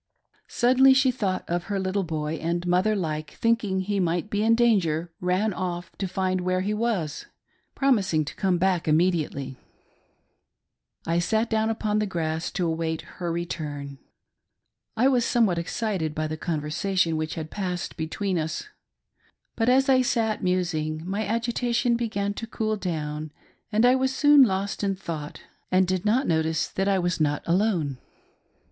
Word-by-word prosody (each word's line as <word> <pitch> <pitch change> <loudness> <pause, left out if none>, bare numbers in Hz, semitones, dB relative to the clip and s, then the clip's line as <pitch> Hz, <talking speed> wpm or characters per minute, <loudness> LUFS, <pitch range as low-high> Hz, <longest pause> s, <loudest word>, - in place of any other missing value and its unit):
Suddenly 260 +2 +5
she 265 -1 +4
thought 195 -7 -2
of 175 0 -2
her 200 -1 -2
little 190 +1 0
boy, 160 -2 -3
and, 170 +2 -1
mother 185 +5 +2
like, 155 -5 -3
thinking 225 -5 +1
he 200 +1 -1
might 175 +3 -1
be 205 - 0
in 225 +1 +4
danger, 175 -9 +2
ran 185 +4 +1
off 175 -1 -4
to 195 - -1
find 185 0 -1
where 185 0 0
he 205 +3 -1
was, 210 -9 -2 0.5
promising 200 - +2
to - - -6
come 190 -3 +1
back 180 -2 +1
immediately. 155 -5 +1 1.5
I 165 +1 +1
sat 220 +6 0
down 220 0 +2
upon 215 -1 0
the 215 - 0
grass 165 -3 -2
to 180 - -1
await 160 -1 -2 0.2
her 175 -1 -1
return. 150 -5 -5 1.0
I 250 +4 +4
was 255 -3 +3
somewhat 220 -8 +2
excited 170 -3 -2
by 155 - -1
the 155 0 -3
conversation 165 +3 -1
which 155 0 -3
had 160 -1 -6
passed 180 -3 -3
between 180 +3 -2
us; 160 - -4 0.9
but 225 +1 +1
as 265 +1 +4
I 260 -1 +5
sat 225 -3 0
musing 170 -3 -1
my 200 +3 -1
agitation 235 +1 0
began 210 -4 -1
to 225 +2 -6
cool 220 -1 -1
down 155 -5 -4 0.4
and 220 +3 +3
I 250 - +6
was 260 0 +1
soon 290 0 +6
lost 200 -3 +1
in 195 -1 +1
thought 160 -5 -6 0.3
and 185 0 +4
did 185 +1 -1
not 250 +6 +3
notice 160 -1 0
that 195 +1 -1
I 195 -1 +3
was 175 -2 -1
not 145 -1 +1
alone. 170 - +1
185 Hz, 160 wpm, -25 LUFS, 165-220 Hz, 1.5 s, I